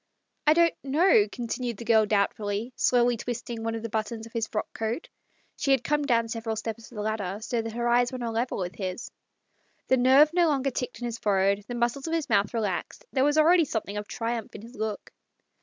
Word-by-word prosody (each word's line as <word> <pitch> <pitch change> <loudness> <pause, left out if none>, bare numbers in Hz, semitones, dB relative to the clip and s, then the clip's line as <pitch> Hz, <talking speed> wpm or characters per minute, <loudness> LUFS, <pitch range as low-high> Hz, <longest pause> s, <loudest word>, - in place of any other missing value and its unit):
" - - -36
I 305 - +8
don't 335 0 +4
know," 280 - +4
continued 240 -1 -4
the 235 - -8
girl 220 -2 +4
doubt 200 -1 +2
fully, 210 +4 -4
slowly 245 -1 +3
twisting 235 0 -5
one 225 0 -2
of 225 - -5
the 230 - -4
buttons 220 +1 -3
of 230 - -14
his 225 -2 -1
frock 215 - -4
coat. 225 +8 -3 0.5
She 275 - -2
had 265 -3 +4
come 295 0 0
down 230 -4 +2
several 225 -1 -3
steps 225 +1 -6
of - - -13
the 210 - -3
ladder, 205 -3 -2
so 230 +1 -2
that 225 0 -6
her 240 +1 -1
eyes 245 +1 +3
were - - -5
on 250 - -5
a 230 - -2
level 235 +3 -1
with 180 -2 -4
his... 185 +3 -5 0.8
The 260 - +5
nerve 270 +5 +6
no 350 -1 +4
longer 275 -3 +1
ticked 250 0 -4
in 240 - -5
his 230 -1 -4
forehead, 200 0 +1
the 245 - -5
muscles 240 +5 -1
of 325 - 0
his 310 -3 -2
mouth 205 -1 +3
relaxed; 210 -6 -3
there 260 - +3
was 295 +2 +2
already 335 +3 +6
something 215 -5 -3
of 205 0 -4
triumph 230 0 -4
in 210 - -9
his 235 +2 -12
look. 220 -3 -4
230 Hz, 235 wpm, -27 LUFS, 220-255 Hz, 0.8 s, I